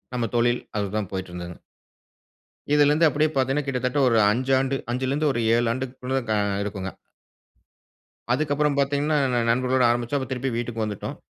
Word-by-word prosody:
நம்ம 120 -2 -1
தொழில். 120 +1 +2 0.2
அதுதான் 100 -1 -2
போயிட்டுருந்ததுங்க. 90 -2 -6 1.1
இதிலிருந்து 150 +2 +5
அப்டீயே 155 +1 +1
பாத்தீங்கன்னா 135 +2 +1
கிட்டத்தட்ட 125 +1 -1
ஒரு 115 -2 +3
5 130 +4 0
ஆண்டு 135 +1 0 0.2
5லிருந்து 130 -1 0
7 120 0 +1
ஆண்டுகுள்ள 130 +1 -3
க - - +3 0.3
இருக்குங்க. 95 -2 -4 1.4
அதுக்கப்பறம் 145 +1 0
பாத்தீங்கன்னா 145 +2 +1 0.2
ந 120 - +2
நண்பர்களோடு 130 +1 +2
ஆரம்பிச்சோம். 120 +3 -1
திருப்பி 130 +1 -2
வீட்டுக்கு 115 -1 -3
வந்துட்டோம். 105 -2 -5
130 Hz, 125 wpm, -24 LUFS, 115-140 Hz, 1.4 s, இதிலிருந்து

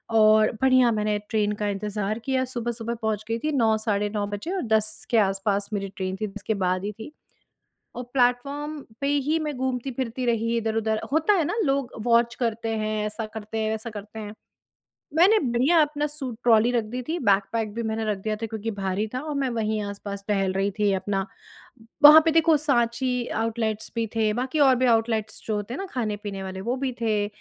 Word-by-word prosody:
और 215 0 +6
बढ़िया 255 -2 +5
मैंने 210 -1 0
ट्रेन 210 -1 +1
का 210 - +1
इंतज़ार 210 +1 -3
किया, 260 +2 0
सुबह-सुबह 235 -2 -4
पहुँच 215 -1 -1
गई 230 +1 -1
थी 310 - -1
9 230 -6 +3
साढ़े 210 -1 -1
9 205 -1 -2
बजे 205 - -5
और 375 - -1
10 215 0 -1
के 235 - +4
आस-पास 200 0 +1
मेरी 195 -1 -2
ट्रेन 190 -1 -3
थी, 215 - 0
जिसके 210 +2 -4
बाद 185 -2 0
ही 210 - -2
थी। 220 - -8 0.8
और 245 - -4
प्लेटफ़ॉर्म 280 +4 0 0.2
पे 280 - 0 0.2
ही 320 +2 +2
मैं 300 -2 -3
घूमती-फिरती 255 -1 -3
रही 230 0 +1
इधर-उधर, 220 -1 0
होता 320 +7 +3
है 360 -5 +2
ना, - - -2
लोग 275 -3 0
वॉच 235 0 +3
करते 230 -2 -1
हैं, 215 0 -1
ऐसा 215 +1 -4
करते 220 0 -6
हैं, 215 0 0
वैसा 220 +1 -4
करते 210 0 -9
हैं। 210 -1 -7 0.8
मैंने 375 +7 +6
बढ़िया 260 +5 +2
अपना 295 0 0
सूट 270 -6 -6
ट्रॉली 230 0 +5
रख 240 -2 +1
दी 245 +4 -5
थी, 330 - 0
बैगपैक 205 -1 +1
भी 235 +1 -3
मैंने 220 0 -2
रख 210 -2 -1
दिया 215 -1 -1
था 225 - -4
क्योंकि 225 0 -4
भारी 195 +2 -1
था 255 - -2
और 300 -1 -4
मैं 265 - 0
वहीं 220 -2 -1
आस-पास 200 0 -6
टहल 195 -3 +1
रही 195 +1 0
थी 205 -1 +3
अपना 195 0 -1 0.8
वहाँ 305 +2 +11
पे 325 - +4
देखो 325 0 +4
साँची 250 -3 0
आउटलेट्स 220 -1 -2
भी 230 -1 0
थे, 220 -1 +2
बाकी 255 +6 -2
और 270 -3 +6
भी 255 +1 +1
आउटलेट्स 225 -2 -2
जो 215 - 0
होते 210 +3 -4
हैं - - -5
ना - - -4
खाने-पीने 210 -5 -3
वाले 190 0 -6
वो 235 +5 -1
भी 270 -2 0
थे। 210 -2 +1
225 Hz, 200 wpm, -25 LUFS, 210-255 Hz, 0.8 s, वहाँ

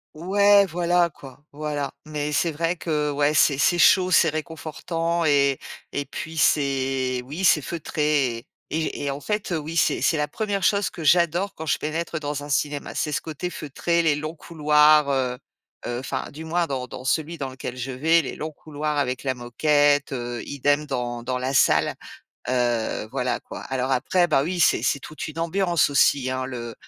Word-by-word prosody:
Ouais, 200 +4 +4
voilà, 175 0 +2
quoi, 135 0 -14
voilà, 145 -1 -3
mais 150 -1 -3
c'est 165 +3 +1
vrai 165 +3 -1
que, 150 -3 -1
ouais, 145 +1 +1
c'est 140 -2 +4
c'est 175 +4 +3
chaud, 185 +1 +5
c'est 170 -2 +5
réconfortant 165 +2 -3
et 140 -2 +3 0.3
et 145 0 -3
puis 160 +1 -7
c'est, 135 -4 +1
oui, 155 +8 -6
c'est 155 - +5
feutré 150 -5 -1
et 115 - -12 0.2
et 160 -1 -2
et 140 - -1
en 140 - -5
fait, 210 +5 -3
oui, 160 0 -3
c'est - - +2
c'est 160 - +2
la 150 0 0
1re 205 -1 -2
chose 200 -1 +2
que 165 - -8
j'adore 175 +4 +3
quand 160 - -7
je - - +2
pénètre 160 +1 -3
dans 145 -1 -4
un 145 - -9
cinéma. 145 0 -1
C'est 150 - -1
ce - - -1
côté 160 +3 -5
feutré, 170 +4 -1
les 155 -3 +2
longs 155 +3 -5
couloirs, 150 -2 +4
heu 125 -2 0 0.5
heu, 120 0 -3
enfin, 130 - -4
du 160 +3 -9
moins, 170 +1 0
dans 130 -3 -3
dans 125 - -9
celui 160 +5 -1
dans 135 -2 -4
lequel 130 -1 -7
je 130 +2 -4
vais, 160 +6 +3
les - - -6
longs 155 +1 -4
couloirs 150 0 -4
avec 130 -2 -1
la 130 -1 -1
moquette, 145 +4 +2
heu, 120 -1 -4
idem 145 +2 +1
dans 120 -3 -3
dans 125 +1 -2
la 130 +2 -2
salle, 135 - +3 0.6
heu, 120 -4 0
voilà, 125 -2 -1
quoi. - - -9
Alors 130 0 -2
après, 175 +8 +2
bah, 145 -5 +2
oui, 175 +4 -2
c'est - - +4
c'est 140 - +1
toute 155 +3 -7
une 155 +1 -9
ambiance 170 -2 +1
aussi, 140 -2 +3
hein 130 0 -2
le 120 -3 -6
150 Hz, 190 wpm, -24 LUFS, 135-165 Hz, 0.6 s, chaud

